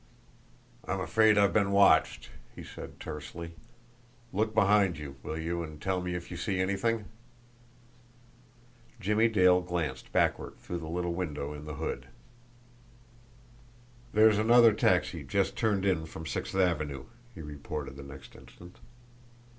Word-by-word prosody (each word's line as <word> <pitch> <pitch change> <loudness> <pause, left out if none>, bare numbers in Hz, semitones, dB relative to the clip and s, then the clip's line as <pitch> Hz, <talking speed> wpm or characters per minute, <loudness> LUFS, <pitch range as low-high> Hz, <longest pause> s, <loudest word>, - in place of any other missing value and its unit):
"I'm 95 - -3
afraid 110 +2 +3
I've 100 -3 +4
been 100 -2 +2
watched," 100 -6 +4 0.2
he - - -9
said - - -10
tersely. 80 +2 -7 0.8
"Look 110 +3 0
behind 100 -3 +4
you, 70 -2 -8
will 80 - -5
you, 85 +1 -2
and 80 -2 -8
tell 95 +1 -1
me 90 0 -3
if 90 0 -7
you 90 - -5
see 95 +2 -2
anything?" 100 +4 0 1.9
Jimmie 105 +4 +2
Dale 90 -4 +4
glanced 90 -2 -4
backward - - 0
through 85 - -6
the 80 -1 -7
little 85 +1 -2
window 75 -5 -4
in 75 0 -9
the 75 -1 -6
hood. 65 -1 -4 2.0
"There's 110 -1 +5
another 115 0 +6
taxi - - +1
just - - 0
turned 100 -3 0
in 85 -5 +1
from 80 0 -9
Sixth 80 - -4
Avenue," 75 -7 0 0.3
he - - -8
reported 75 -1 -6
the 70 - -9
next 70 -1 -12
instant. 90 +1 -15
90 Hz, 140 wpm, -29 LUFS, 80-100 Hz, 2.0 s, another